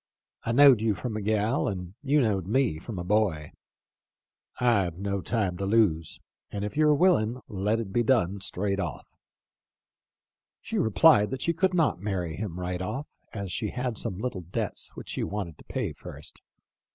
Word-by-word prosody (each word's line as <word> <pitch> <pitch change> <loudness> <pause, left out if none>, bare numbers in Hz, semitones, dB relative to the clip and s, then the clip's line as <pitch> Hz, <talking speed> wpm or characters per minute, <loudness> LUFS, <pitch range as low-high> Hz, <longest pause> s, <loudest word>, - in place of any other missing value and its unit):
I 115 - -1
knowed 130 -2 +7
you 110 -2 +1
from 110 +5 -4
a 110 - -2
gal 110 +5 +1
and 90 -2 -4
you 145 +1 +3
knowed 100 -7 0
me 115 - +1
from 105 +3 -7
a 90 - -3
boy. 90 -6 +1 1.1
I've 100 -9 +2
no 100 0 -2
time 100 -4 -1
to 100 - -2
lose; 95 -8 +2 0.3
and 100 0 -3
if 105 - -5
you're 150 0 +4
willin' 135 -9 +3
let 105 +2 0
it 100 -4 -5
be 120 - +3
done 105 -6 +2
straight 100 +1 -1
off.' - - -5 1.4
She - - -3
replied 110 0 +5
that 135 -1 -4
she 170 - +1
could 185 +2 +1
not 155 - +2
marry 90 -6 -2
him 90 -3 -5
right 90 0 -3
off, 135 +10 -3 0.3
as 100 -3 -5
she 105 +4 -2
had 125 0 -3
some 105 -3 -2
little 105 -3 -3
debts 85 +1 -4
which - - -9
she - - -2
wanted 95 -7 -4
to - - -15
pay - - -3
first. - - -9
105 Hz, 175 wpm, -27 LUFS, 95-120 Hz, 1.4 s, knowed